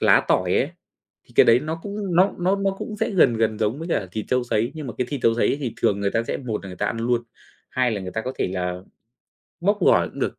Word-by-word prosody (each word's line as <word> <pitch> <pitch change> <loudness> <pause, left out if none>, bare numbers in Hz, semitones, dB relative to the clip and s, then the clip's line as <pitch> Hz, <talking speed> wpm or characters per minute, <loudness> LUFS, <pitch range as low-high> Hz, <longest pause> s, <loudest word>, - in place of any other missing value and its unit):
lá - - +5
tỏi - - +2
ấy. - - +1 0.5
Thì - - -22
cái - - +7
đấy 115 +2 +6
nó 160 +2 -4
cũng 200 -4 -3
nó 190 +2 +5
nó 185 +3 +2
nó 195 0 +1
cũng 210 - -5
sẽ - - -1
gần 140 - +4
gần 110 -1 0
giống 115 +7 0
với 165 - -6
cả 110 - 0
thịt 110 - -3
trâu 125 -1 +1
sấy, 115 +1 0
nhưng 155 -3 -6
mà 120 - -5
cái 125 - 0
thịt 140 -3 -3
trâu 115 - +4
sấy 120 - +2
thì 120 -4 -3
thường 100 0 +2
người 100 0 +1
ta 115 - +1
sẽ - - -3
một 115 -7 -4
là 95 - -7
người 90 - -9
ta - - -1
ăn 115 - -2
luôn, 120 0 +1 0.5
hai 125 -1 +1
là 105 -3 -2
người 95 -1 -6
ta 110 - -2
có 130 - -4
thể - - 0
là 90 -1 -3 0.8
bóp 205 +3 +2
gỏi - - +4
cũng - - -12
được, - - -2
120 Hz, 285 wpm, -23 LUFS, 110-165 Hz, 0.8 s, cái